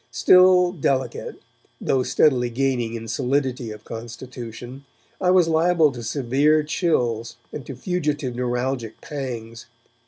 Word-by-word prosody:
Still 180 -1 +5
'delicate', 130 -7 -2 0.4
though 130 - +1
steadily 125 -2 +2
gaining 120 -2 -1
in 115 0 -6
solidity 130 -1 -1
of 105 0 -9
constitution, 120 +2 -8 0.4
I 180 - +2
was 180 -2 +5
liable 165 -1 +3
to 125 -2 -8
severe 140 +6 +2
chills 120 - -1 0.2
and 145 - -6
to 135 - -6
fugitive 150 -4 -2
neuralgic 125 -1 -2
pangs. 115 -5 -6
130 Hz, 120 wpm, -23 LUFS, 120-150 Hz, 0.4 s, Still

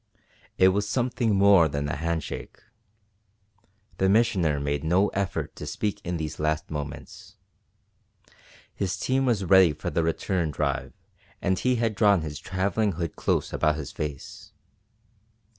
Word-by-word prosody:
It 95 - +6
was 100 +2 -1
something 120 -3 0
more 100 -4 +6
than 70 0 -3
a 70 - -2
hand 80 +1 -2
shake. - - -7 1.4
The 95 - +3
Missioner 95 -9 +2
made 70 0 -2
no 90 +6 +2
effort 100 -2 -3
to - - -7
speak 105 -1 -3
in 90 -2 -3
these 80 -1 -5
last 75 +1 -1
moments. 75 -2 -7 1.4
His 90 -2 -2
team 130 +6 0
was 105 -6 +1
ready 95 -3 +6
for - - -5
the - - +1
return 80 +1 -1
drive 75 - -2 0.5
and 95 0 0
he 125 0 +1
had 115 -2 0
drawn 100 -3 +4
his 75 -2 -6
travelling 100 +2 -1
hood 85 -1 -4
close - - -1
about 75 -1 +2
his 75 -3 -6
face. 75 -3 -7
90 Hz, 145 wpm, -26 LUFS, 75-100 Hz, 1.4 s, It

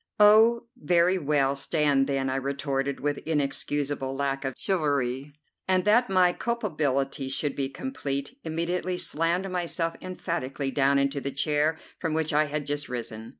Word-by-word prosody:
"Oh, 220 +3 +6
very 180 -5 +2
well; 140 -3 +1
stand 140 -2 +1
then!" 135 -1 0
I 130 - -1
retorted 140 0 -2
with 145 0 -1
inexcusable 145 -2 -1
lack 135 0 -1
of 135 -2 -3
chivalry, 145 -6 0 0.4
and, 185 -1 +2
that 235 +4 +4
my 185 -2 +4
culpability 145 - -1
should 145 +2 -1
be 135 -1 -2
complete, 140 - -4
immediately 175 +3 -2
slammed 170 +2 0
myself 170 -2 -1
emphatically 150 -7 -3
down 140 0 +3
into 140 0 0
the 135 - -3
chair 150 +3 +1 0.2
from 160 -2 -1
which 160 -1 0
I 150 +1 +4
had 150 0 -3
just 145 0 -3
risen. 115 -2 -6
145 Hz, 150 wpm, -27 LUFS, 135-175 Hz, 0.4 s, Oh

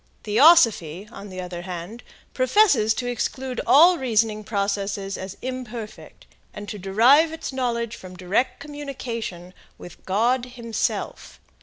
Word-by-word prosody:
Theosophy, 215 - +4
on 200 -2 -10
the 185 -1 -8
other 180 -1 -7
hand, 180 +6 -7 0.3
professes 255 - +3
to 245 - -4
exclude 250 +1 -3
all 340 +4 +6
reasoning 220 -4 0
processes 200 -1 -2
as 190 +1 -7
imperfect, 240 -4 -7 0.3
and 205 0 -8
to 210 - -6
derive 240 - +4
its 320 -4 -6
knowledge 235 -3 -2
from 185 -1 -11
direct 190 +8 -1
communication 240 -11 -7 0.2
with 175 - -13
God 240 +6 +1
himself. 235 -3 -4
225 Hz, 125 wpm, -23 LUFS, 195-255 Hz, 0.3 s, all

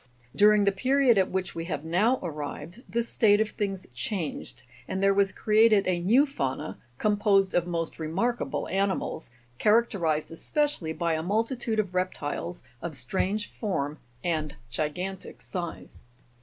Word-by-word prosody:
Dur 210 +1 +7
ing 210 -1 +4
the 200 - +4
period 255 +2 +3
at 190 - +2
which 190 -1 -2
we 165 0 -4
have 155 -4 -3
now 210 +10 +2
arrived, 155 +4 -6
this 235 0 -1
state 205 -3 +4
of 220 0 +1
things 195 -3 -3
changed, 145 - -4 0.2
and 190 +1 -2
there 195 0 +5
Avas 195 -1 +2
created 215 -1 +4
a 180 -1 +1
new 230 +11 +4
fauna 140 - -3 0.2
composed 205 - +3
of 175 0 +1
most 165 -2 -3
remarkable 195 +10 -1
animals, 195 -5 -1 0.3
characterized 200 -9 +2
especially 290 - -1
by 170 0 0
a 160 - 0
multitude 225 +5 -1
of 200 -4 0
reptiles, 180 -1 -3 0.2
of 170 -3 -4
strange 190 - -1
form 155 -9 -2 0.2
and 155 -4 -1 0.2
gigantic 180 +8 -4
size. 175 -3 -6
190 Hz, 145 wpm, -27 LUFS, 165-215 Hz, 0.3 s, Dur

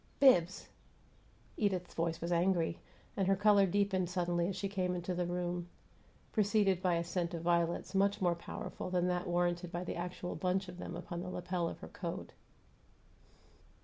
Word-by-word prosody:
"Bibbs!" 185 -10 +5 0.9
Edith's 190 -4 0
voice 165 0 -1
was 170 +1 -2
angry, 170 -1 +2 0.4
and 195 -2 +1
her 195 - +4
color 205 0 +5
deepened 190 -1 +1
suddenly 175 -1 0
as 195 - -2
she 200 - -2
came 185 -2 -1
into 175 +1 -2
the 175 0 -1
room, 175 0 -2 0.6
preceded 205 -3 +3
by 180 -2 +2
a 170 - 0
scent 175 0 -2
of 165 - -5
violets 170 +1 +1
much 200 +2 +3
more 180 -3 +3
powerful 170 +1 -6
than 180 -1 +1
that 180 +1 -1
warranted 175 0 0
by 175 +1 -3
the - - -4
actual 180 +1 -4
bunch 190 +1 0
of 180 0 -9
them 175 - -5
upon 175 0 -5
the 180 - -5
lapel 180 -1 -2
of - - -9
her - - -7
coat. 180 0 -6
180 Hz, 175 wpm, -34 LUFS, 175-190 Hz, 0.9 s, Bibbs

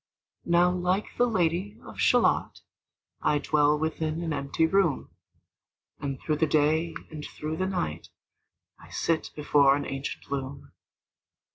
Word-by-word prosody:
Now 175 +1 +4
like 180 +3 -1
the 245 - +3
Lady 185 0 0
of - - -11
Shalott, - - +2 0.6
I 150 - +2
dwell 150 0 +2
within 160 +1 -2
an 160 -2 -2
empty 140 +3 0
room, 170 -4 +1 0.9
And 140 -2 -4
through 155 -1 -1
the 160 +1 +2
day 155 +3 +2 0.2
and 155 -1 -7
through 155 +2 -5
the 185 - 0
night 85 - -3 0.7
I - - -15
sit 165 -1 -1
before 145 -2 +4
an 145 - -3
ancient 135 0 -6
loom. 135 0 -5
155 Hz, 135 wpm, -27 LUFS, 145-175 Hz, 0.9 s, Now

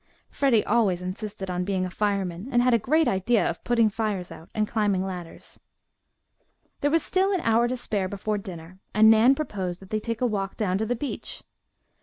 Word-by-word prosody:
Freddie 250 -6 +2
always 200 -6 +2
insisted 195 +2 -5
on 180 0 -1
being 185 -1 -1
a - - -4
fireman 195 -1 -2
and 240 0 +3
had 250 -1 +3
a 235 - +4
great 310 +8 +2
idea 205 +4 +2
of 170 - -4
putting 235 -2 +3
fires 210 -4 -2
out 165 - -11
and 215 -1 +1
climbing 205 -4 0
ladders. 180 -3 -8 1.2
There 290 - +1
was 325 +1 +2
still 380 +1 +1
an 375 -3 0
hour 230 -1 +3
to 255 +1 -2
spare 205 -5 -2
before 205 +2 -2
dinner, 180 -1 -10 0.2
and 220 +1 +7
Nan 230 +5 +6
proposed 190 - -4
that 190 - -15
they 215 - 0
take 230 +1 -4
a 250 - +1
walk 200 -4 -2
down 195 -3 0
to 220 - -1
the 245 - 0
beach. 275 +4 -4
210 Hz, 200 wpm, -25 LUFS, 190-235 Hz, 1.2 s, and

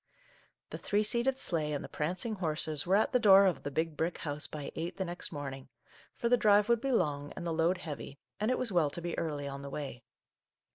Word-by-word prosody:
The - - -5
three 205 +1 +1
seated 240 +5 +2
sleigh 155 - 0
and 145 - -3
the - - -6
prancing 180 +9 -2
horses 155 -3 -1
were 190 - +4
at 215 - +3
the 250 - +5
door 200 -3 +8
of 185 -4 +1
the - - -4
Big 160 +2 -1
Brick 165 +3 -1
House 150 -1 -2
by 150 -2 -6
eight 170 +2 -4
the 190 - -1
next 175 0 -6
morning, 135 -3 -6 0.5
for 235 - -1
the 245 +1 +5
drive 205 -2 +5
would 235 -1 +3
be 275 - -1
long 145 - 0
and 175 - -6
the 165 - -1
load 165 +3 +2
heavy, 145 -3 -7 0.2
and 215 +2 0
it 255 - +2
was 245 -4 -1
well 170 -5 +3
to 145 - -6
be 170 0 -3
early 145 -3 -3
on 140 0 -6
the 140 - -7
way. 135 -4 -6
170 Hz, 235 wpm, -32 LUFS, 150-205 Hz, 0.5 s, door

